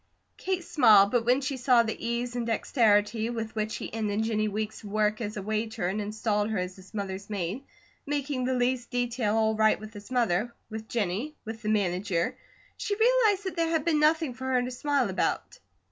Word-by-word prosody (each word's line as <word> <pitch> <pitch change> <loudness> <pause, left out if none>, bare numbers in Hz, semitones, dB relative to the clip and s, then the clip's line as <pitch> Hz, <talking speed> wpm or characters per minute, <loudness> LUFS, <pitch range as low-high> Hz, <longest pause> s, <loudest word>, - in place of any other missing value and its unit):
Kate 375 -2 -2
smiled, 215 -11 +6
but 240 -2 +1
when 250 +3 +3
she 270 0 -2
saw 245 -1 +4
the 220 -1 -3
ease 235 +1 -2
and 240 -1 -2
dexterity 220 -1 +2
with 225 -2 -4
which 215 0 -2
he - - -6
ended 215 -1 -1
Jennie 215 -1 0
Weeks' 215 +1 -4
work 215 +1 0
as 210 -1 -4
a 200 - -4
waiter 220 -1 -2
and 200 +4 -1
installed 210 0 -1
her 220 - -1
as 180 0 -3
his 190 -1 -15
mother's 200 -1 -5
maid, 200 +5 -3 0.4
making 280 -2 -2
the 260 0 0
least 245 0 0
detail 245 -3 0
all 220 -1 +3
right 215 0 +3
with 215 0 -10
his 205 +1 -11
mother, 235 -2 0 0.2
with 220 0 -7
Jennie, 225 - -2
with 225 0 -6
the 215 - -2
manager, 195 +1 0 0.4
she 405 - -2
realized 445 -3 +3
that 375 - -4
there 330 -1 +1
had 320 -3 0
been 320 -3 +3
nothing 310 -2 +3
for 260 +2 -8
her 255 -1 +2
to 250 - -4
smile 275 0 +1
about. 190 0 -2
225 Hz, 200 wpm, -28 LUFS, 210-255 Hz, 0.4 s, smiled